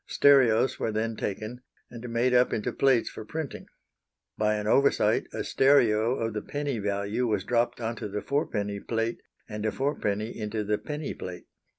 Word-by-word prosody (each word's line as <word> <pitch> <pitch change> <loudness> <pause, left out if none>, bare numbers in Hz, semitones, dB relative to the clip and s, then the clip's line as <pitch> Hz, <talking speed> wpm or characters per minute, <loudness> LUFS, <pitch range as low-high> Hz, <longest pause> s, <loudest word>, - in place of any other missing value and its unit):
Stereos 130 -3 +4
were 110 - -1
then 110 +1 -1
taken, 110 +5 -4 0.3
and 120 0 -8
made 120 +2 +1
up 125 0 +4
into 105 - -2
plates 135 -4 +3
for - - -7
printing. 155 +5 -6 0.7
By 105 0 +1
an 105 0 -3
oversight 140 +6 +3
a - - -3
stereo 120 -4 +3
of 115 -3 -2
the 105 - -3
penny 145 -4 -3
value 100 +4 -1
was 105 -4 0
dropped 120 0 0
into 115 -2 -4
the 105 +1 -4
fourpenny 105 -8 -1
plate 115 +2 -2 0.3
and 105 -1 -5
a 110 - +1
fourpenny 110 -6 -2
into 105 0 -3
the 105 0 0
penny 150 -1 -5
plate. 90 -1 -8
115 Hz, 170 wpm, -27 LUFS, 105-125 Hz, 0.7 s, Stereos